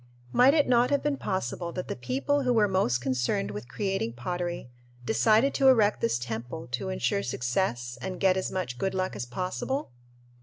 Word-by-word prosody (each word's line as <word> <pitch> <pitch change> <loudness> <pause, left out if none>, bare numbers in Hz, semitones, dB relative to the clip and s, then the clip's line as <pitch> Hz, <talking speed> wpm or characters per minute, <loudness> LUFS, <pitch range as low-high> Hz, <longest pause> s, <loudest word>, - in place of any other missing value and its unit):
Might 265 +4 +6
it 295 -2 +3
not 245 0 +4
have 285 - +1
been 295 -1 +1
possible 175 - -3
that 180 - -4
the - - -3
people 130 - 0
who 250 -2 +2
were 215 -3 +4
most 185 -11 +1
concerned 125 -6 -1
with 105 +3 -7
creating 195 - -2
pottery 175 +2 -4 0.3
decided 215 - +3
to 270 - +3
erect 220 -5 +4
this 115 +1 +1
temple 120 +5 -5
to 120 - -2
insure 60 +10 0
success 120 - -2
and 185 -1 -5
get 190 -2 +4
as 190 - -2
much 125 -10 -3
good 190 0 -1
luck 185 0 -1
as 120 - -5
possible? 185 - -3
175 Hz, 185 wpm, -28 LUFS, -, 0.3 s, Might